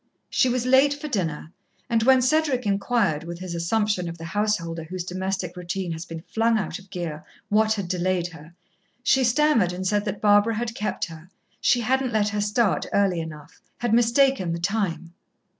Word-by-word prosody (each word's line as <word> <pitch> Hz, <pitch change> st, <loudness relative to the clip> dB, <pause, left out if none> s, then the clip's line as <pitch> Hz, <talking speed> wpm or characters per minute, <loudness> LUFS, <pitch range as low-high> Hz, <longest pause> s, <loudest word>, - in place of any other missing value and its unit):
She 255 Hz, -, +3 dB
was 250 Hz, 0 st, 0 dB
late 265 Hz, +3 st, +5 dB
for 290 Hz, +1 st, -6 dB
dinner, 165 Hz, -, -3 dB, 0.4 s
and 230 Hz, -2 st, +1 dB
when 260 Hz, +2 st, +5 dB
Cedric 275 Hz, -2 st, +1 dB
inquired, 200 Hz, -5 st, +1 dB
with 170 Hz, +1 st, -6 dB
his 180 Hz, -1 st, -6 dB
assumption 180 Hz, +1 st, 0 dB
of 170 Hz, -, -8 dB
the 165 Hz, -, -8 dB
householder 185 Hz, -4 st, -1 dB
whose 180 Hz, +2 st, -5 dB
domestic 185 Hz, 0 st, -3 dB
routine 180 Hz, 0 st, -4 dB
has 165 Hz, +1 st, -5 dB
been 165 Hz, -1 st, -8 dB
flung 225 Hz, +3 st, +1 dB
out 195 Hz, -2 st, -3 dB
of 195 Hz, 0 st, -18 dB
gear, 170 Hz, -5 st, -5 dB, 0.3 s
what 220 Hz, +1 st, +3 dB
had 200 Hz, -4 st, -4 dB
delayed 180 Hz, 0 st, 0 dB
her, 165 Hz, 0 st, -14 dB, 0.5 s
she 265 Hz, +1 st, +3 dB
stammered 245 Hz, -, +3 dB
and 185 Hz, +1 st, -5 dB
said 205 Hz, +2 st, +1 dB
that 205 Hz, -1 st, -3 dB
Barbara 205 Hz, +2 st, +4 dB
had 230 Hz, +1 st, -3 dB
kept 210 Hz, -3 st, -2 dB
her 165 Hz, 0 st, -12 dB, 0.3 s
she 245 Hz, -2 st, +3 dB
hadn't 260 Hz, +1 st, 0 dB
let 210 Hz, -1 st, +2 dB
her 210 Hz, 0 st, -2 dB
start 210 Hz, 0 st, +1 dB
early 195 Hz, -4 st, +2 dB
enough 155 Hz, -2 st, -9 dB, 0.2 s
had 240 Hz, -2 st, -1 dB
mistaken 240 Hz, -4 st, +3 dB
the 170 Hz, -, -3 dB
time. 175 Hz, -3 st, -2 dB
200 Hz, 185 wpm, -24 LUFS, 175-230 Hz, 0.5 s, late